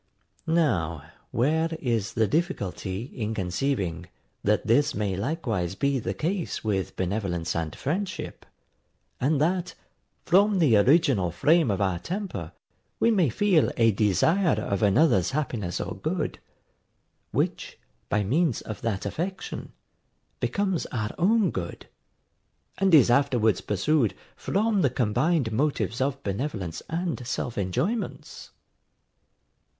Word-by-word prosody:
Now 85 - 0 0.2
where 160 +7 +1
is 115 -6 -1
the 110 -2 +3
difficulty 105 - -2
in 115 -4 -4
conceiving, 90 -3 -2 0.4
that 105 +1 +1
this 145 +6 +3
may 100 -2 -1
likewise 105 - -2
be 140 +5 +1
the - - -3
case 175 +2 -2
with 100 -4 -1
benevolence 90 -3 -2
and 80 -2 -2
friendship, 180 +6 -4 0.8
and 140 +3 +2
that, 175 +3 0 0.5
from 200 +3 +4
the 150 -10 +4
original 120 - +4
frame 150 - +3
of 100 0 0
our 95 -3 +1
temper, 170 - -5 0.5
we 230 - +4
may 185 - +3
feel 180 - +3
a 115 -2 +5
desire 135 - +2
of 100 - -2
another's 105 - +4
happiness 120 - -2
or - - -4
good, - - -2 0.9
which, - - -2 0.3
by 105 0 +1
means 145 - +1
of 110 - -7
that 105 -4 -2
affection, 175 - -4 0.7
becomes 195 -4 -1
our 110 -3 -3
own 205 0 +3
good, 85 -2 -5 0.9
and 190 -3 +5
is 130 -5 +6
afterwards 120 -6 +3
pursued, 115 - +1 0.2
from 210 0 0
the 140 - +3
combined 125 +3 +1
motives 115 - 0
of 140 0 -1
benevolence 100 - -3
and 165 -7 -3
self 120 -2 -3
enjoyments? 170 - -3
125 Hz, 120 wpm, -26 LUFS, 100-165 Hz, 0.9 s, is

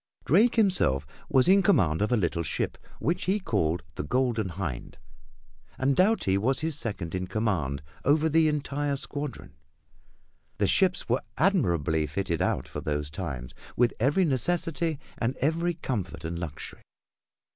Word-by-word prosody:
Drake 210 - +4
himself 180 - +3 0.2
was 130 -1 +4
in 195 +2 +6
command 90 - +3
of 105 - +1
a 120 - +4
little 85 -4 0
ship 80 - -2 0.2
which 170 +4 -1
he 195 +3 +1
called 85 - 0
the - - -4
Golden 115 - 0
Hind, 85 -8 -5 0.8
and 135 +1 +1
Doughty 185 - +3
was 130 +8 +1
his 160 -1 0
second 100 - -4
in 95 0 -2
command 85 -11 -1 0.2
over 150 +3 +3
the 160 0 +4
entire 145 -1 -1
squadron. 145 -1 -5 1.0
The - - +2
ships 185 -1 +2
were 125 +3 +1 0.2
admirably 85 - +2
fitted 85 +2 -2
out - - 0
for - - -6
those 75 -1 -2
times, 70 -8 -5 0.2
with 120 0 +3
every 145 - +3
necessity 165 +2 +1 0.2
and 125 +3 -1
every 165 +4 0
comfort 105 - -4
and 85 +1 -4
luxury. 80 -4 -7
120 Hz, 145 wpm, -27 LUFS, -, 1.0 s, in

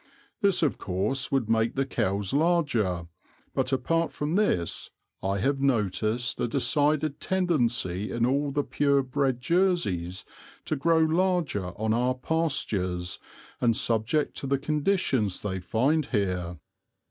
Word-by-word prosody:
This, 200 -4 +2
of 150 - +1
course, 105 +9 -2
would 135 -5 +1
make 115 0 +1
the 135 0 +1
cows 100 -6 -1
larger; 135 - +1 0.5
but 130 - 0
apart 165 +6 +1
from 150 +2 -3
this, 180 - 0 0.3
I 100 +1 -1
have 135 +8 0
noticed 115 -1 0
a - - +1
decided 145 +4 +1
tendency 120 - 0
in 115 0 +1
all 140 +3 +1
the 145 +1 0
pure 140 -1 +2
bred 130 -1 0
Jerseys 125 - 0 0.4
to 155 - -1
grow 165 +4 +2
larger 160 - +1
on 110 0 +1
our 125 +2 +1
pastures 105 - -1 0.4
and 115 -2 +2
subject 115 +6 +1
to 140 - -3
the 140 +1 +2
conditions 145 - 0
they 95 -2 -3
find 130 - +1
here." 90 - -1
130 Hz, 135 wpm, -27 LUFS, 105-150 Hz, 0.5 s, This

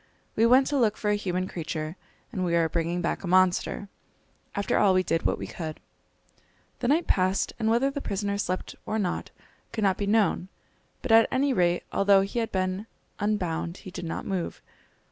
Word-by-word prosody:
We 225 +1 +4
went 260 +3 +6
to 285 0 0
look 220 -3 +2
for 210 - 0
a - - +3
human 185 -2 -2
creature, 160 -2 -4 0.4
and 190 -6 -2
we 170 -1 +1
are 165 -1 +3
bringing 170 +2 -1
back - - -1
a - - -4
monster! 185 +2 +2 0.7
After 200 0 +1
all 195 -2 +4
we 185 - +3
did 165 -2 0
what - - 0
we - - -5
could." 160 -3 -6 1.0
The 240 - -1
night 315 +6 +3
passed, 185 +1 +1
and 220 -1 +1
whether 245 +5 +3
the 285 0 -4
prisoner 200 -2 -2
slept 185 -2 -2
or 220 - -1
not 190 -5 -2 0.4
could 220 - -2
not 195 -2 +2
be 200 - -1
known; 205 -3 +2 0.6
but - - -1
at 225 0 +7
any 270 +1 +2
rate, 175 -4 +2
although 200 0 +5
he 195 +5 -2
had 225 -1 -2
been 185 +2 -1 0.3
unbound, 180 -4 -1
he 185 - -7
did 175 - -6
not 165 - -4
move. 185 -3 -3
195 Hz, 195 wpm, -27 LUFS, 180-220 Hz, 1.0 s, at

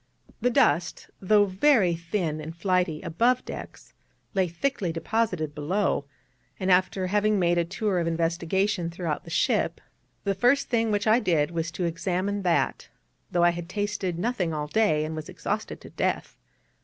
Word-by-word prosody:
The 245 - +3
dust, 175 - +1
though 205 +2 +4
very 195 -1 +3
thin 165 -2 -2
and 160 +2 -8
flighty 180 -3 0
above 240 +9 +1
decks, - - -9 0.4
lay 190 -3 +2
thickly 175 +1 -2
deposited 165 -2 -1
below, 150 +1 0 0.5
and 185 0 +1
after 185 +1 +2
having 210 +2 +2
made 175 -2 +2
a 170 - +1
tour 195 +1 -1
of 170 - -1
investigation 170 +3 0
throughout 170 -3 -4
the - - -10
ship, 165 - +1 0.4
the 200 - +1
first 245 +7 +2
thing 230 -2 +1
which 205 -1 0
I 220 +2 +5
did 160 -8 +1
was 165 -1 -2
to 180 - -2
examine 185 +4 -1
that 175 -3 0 0.4
though 175 -2 +1
I 175 - +6
had 170 0 -7
tasted 205 -3 -2
nothing 180 -5 -1
all 150 -1 -2
day, 155 -3 +2
and 160 +1 -4
was 155 +3 -6
exhausted 205 +4 -4
to - - -12
death. - - -2
180 Hz, 165 wpm, -26 LUFS, 165-205 Hz, 0.5 s, I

